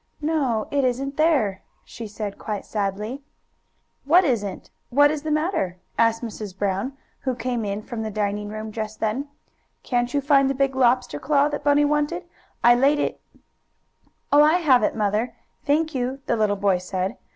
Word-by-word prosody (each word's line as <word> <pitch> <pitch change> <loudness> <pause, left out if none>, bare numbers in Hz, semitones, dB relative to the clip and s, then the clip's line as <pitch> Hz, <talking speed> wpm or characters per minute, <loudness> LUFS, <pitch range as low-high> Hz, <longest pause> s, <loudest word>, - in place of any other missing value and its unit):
"No, 285 -8 0
it 280 -1 +1
isn't 265 +2 -1
there," 275 - +2 0.2
she 230 -2 -8
said, 205 -1 -6
quite 210 -2 -4
sadly. 210 +5 -3 0.8
"What 340 +7 +5
isn't? 210 - -2 0.2
What 290 +3 +5
is 305 -1 -3
the 310 - -4
matter?" 305 - 0 0.2
asked 230 0 +2
Mrs. 210 -4 -6
Brown, 200 +6 -1 0.3
who 260 -2 -2
came 240 -1 -2
in 205 +1 -3
from 235 -1 -5
the 220 - -3
dining 205 0 -2
room 215 +1 -6
just 215 0 -5
then. 225 +7 -1 0.6
"Can't 245 -1 0
you 285 - +1
find 275 -1 +4
the 275 - -1
big 275 0 +1
lobster 250 - +2
claw 290 - +2
that 290 - -4
Bunny 290 0 +4
wanted? 300 +4 0 0.4
I 240 - +8
laid 275 +4 +3
it - - -2 0.6
" - - -16
"Oh, 290 - +8
I 305 +1 +6
have 290 -9 +4
it, - - +1
Mother, 215 +2 0 0.3
thank 315 +2 +2
you," 260 +1 -2
the - - +1
little 215 -2 +1
boy 195 -2 +2
said. 185 +1 -3
245 Hz, 175 wpm, -23 LUFS, 210-285 Hz, 0.8 s, I